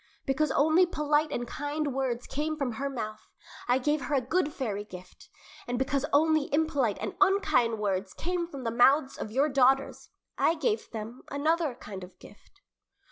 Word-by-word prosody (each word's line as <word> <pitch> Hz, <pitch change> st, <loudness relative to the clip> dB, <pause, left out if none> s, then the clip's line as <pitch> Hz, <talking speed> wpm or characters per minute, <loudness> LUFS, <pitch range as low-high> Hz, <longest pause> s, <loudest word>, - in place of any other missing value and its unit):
Because 285 Hz, +2 st, +1 dB
only 315 Hz, +5 st, +4 dB
polite 300 Hz, -2 st, +1 dB
and 240 Hz, -3 st, -3 dB
kind 290 Hz, +2 st, -3 dB
words 250 Hz, -2 st, -2 dB
came 305 Hz, +3 st, -3 dB
from 275 Hz, -4 st, -1 dB
her 275 Hz, +5 st, -3 dB
mouth, 215 Hz, -5 st, -6 dB, 0.4 s
I 245 Hz, +1 st, +4 dB
gave 295 Hz, +1 st, 0 dB
her 295 Hz, -, 0 dB
a -, -, +4 dB
good 300 Hz, +5 st, 0 dB
fairy 215 Hz, -8 st, -3 dB
gift, 180 Hz, -3 st, -13 dB, 0.4 s
and 245 Hz, 0 st, -2 dB
because 270 Hz, +2 st, 0 dB
only 310 Hz, 0 st, +3 dB
impolite 285 Hz, -8 st, +1 dB
and -, -, -4 dB
unkind 385 Hz, -, +3 dB
words 195 Hz, -2 st, -2 dB
came 350 Hz, 0 st, -2 dB
from 280 Hz, -6 st, -8 dB
the 230 Hz, -, -1 dB
mouths 265 Hz, +4 st, +3 dB
of -, -, -4 dB
your 270 Hz, +7 st, +2 dB
daughters, 270 Hz, -1 st, +2 dB, 0.3 s
I 330 Hz, -, +3 dB
gave 245 Hz, -9 st, -1 dB
them 225 Hz, +2 st, -7 dB
another 305 Hz, 0 st, 0 dB
kind 195 Hz, -5 st, -9 dB
of 180 Hz, -, -12 dB
gift." -, -, -18 dB
270 Hz, 175 wpm, -28 LUFS, 235-305 Hz, 0.4 s, only